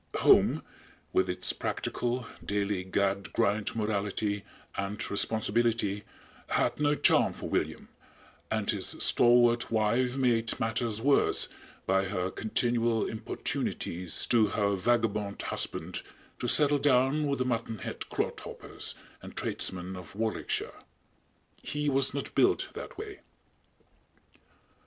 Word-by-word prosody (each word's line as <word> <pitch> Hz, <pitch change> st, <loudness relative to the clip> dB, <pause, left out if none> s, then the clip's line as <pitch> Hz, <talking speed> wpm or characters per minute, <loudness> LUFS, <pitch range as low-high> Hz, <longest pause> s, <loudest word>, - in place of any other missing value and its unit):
Home, -, -, +5 dB, 0.5 s
with 95 Hz, -, +2 dB
its 90 Hz, 0 st, 0 dB
practical, 120 Hz, 0 st, -2 dB, 0.2 s
daily 100 Hz, -2 st, -1 dB
gad 95 Hz, -1 st, 0 dB
grind 105 Hz, +2 st, +1 dB
morality 105 Hz, -1 st, -1 dB, 0.3 s
and 100 Hz, +2 st, -3 dB
responsibility, 110 Hz, 0 st, +1 dB, 0.4 s
had -, -, 0 dB
no 145 Hz, 0 st, +3 dB
charm -, -, +4 dB
for -, -, -6 dB
William, -, -, -2 dB, 0.6 s
and 110 Hz, -1 st, 0 dB
his 100 Hz, -4 st, -1 dB
stalwart 120 Hz, 0 st, +4 dB
wife 115 Hz, +4 st, +1 dB
made 115 Hz, -3 st, +1 dB
matters 115 Hz, 0 st, -1 dB
worse 140 Hz, 0 st, +3 dB, 0.4 s
by 95 Hz, +1 st, +2 dB
her 95 Hz, -1 st, -2 dB
continual 115 Hz, 0 st, 0 dB
importunities 90 Hz, -5 st, -2 dB
to 115 Hz, -3 st, +4 dB
her 100 Hz, -1 st, +1 dB
vagabond 105 Hz, 0 st, 0 dB
husband -, -, -2 dB, 0.4 s
to 120 Hz, -, -2 dB
settle 145 Hz, +3 st, +5 dB
down 135 Hz, +2 st, +3 dB
with 140 Hz, -1 st, 0 dB
the 130 Hz, -, 0 dB
muttonhead 115 Hz, -3 st, -3 dB
clodhoppers -, -, -4 dB, 0.3 s
and -, -, -11 dB
tradesmen 95 Hz, 0 st, -1 dB
of 90 Hz, +1 st, -10 dB
Warwickshire. 110 Hz, +1 st, -2 dB, 0.8 s
He 150 Hz, 0 st, -1 dB
was 135 Hz, 0 st, +2 dB
not 140 Hz, +1 st, -5 dB
built -, -, +3 dB
that -, -, -8 dB
way! 420 Hz, -2 st, -7 dB
110 Hz, 115 wpm, -29 LUFS, 100-120 Hz, 0.8 s, Home